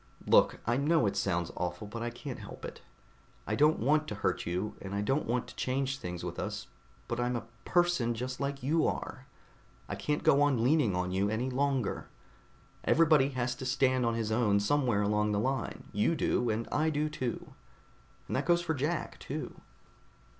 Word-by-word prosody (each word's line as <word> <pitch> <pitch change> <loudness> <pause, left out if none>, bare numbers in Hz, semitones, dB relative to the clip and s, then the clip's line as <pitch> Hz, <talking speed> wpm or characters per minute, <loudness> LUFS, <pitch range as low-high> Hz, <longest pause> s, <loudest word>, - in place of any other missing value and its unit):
"Look, - - +5
I 120 +2 +2
know 150 -1 +3
it 100 -1 0
sounds 90 -4 0
awful, 90 +3 -3
but 115 +3 -6
I 120 - -1
can't 120 +2 -7
help - - -9
it. - - -8 0.6
I - - -2
don't 150 +2 +4
want 150 +6 +2
to 105 - -4
hurt 100 - -1
you, 90 +5 -2
and 95 +1 -5
I 100 - 0
don't 135 +8 0
want 120 +1 0
to - - -12
change 135 +1 -1
things 90 -1 -5
with - - -5
us, - - -4 0.4
but 120 - -2
I'm 120 0 0
a 115 -2 -4 0.2
person 175 -10 +2
just 125 +2 -4
like 140 -1 -3
you 155 +4 +2
are. - - -4 0.6
I - - -4
can't 150 0 -2
go 140 - +5
on 135 -6 +3
leaning 130 - +3
on 90 0 -1
you 95 +2 +1
any 120 +5 -1
longer. 135 -3 0 0.8
Everybody 155 -4 +5
has 120 0 0
to 130 - -6
stand 130 -1 +2
on 115 -1 +1
his 110 -1 -1
own 110 -3 +3
somewhere 115 -1 +2
along 105 +1 +1
the 100 - +1
line. 130 +5 -2
You 105 +11 +2
do, 125 -5 +1
and 110 +1 -1
I 155 +2 +2
do, 150 0 0
too. 130 -6 -4 0.7
And - - -3
that - - -1
goes 175 0 +4
for 160 -2 0
Jack, 155 +3 -2
too." - - -6
125 Hz, 195 wpm, -31 LUFS, 105-145 Hz, 0.8 s, Look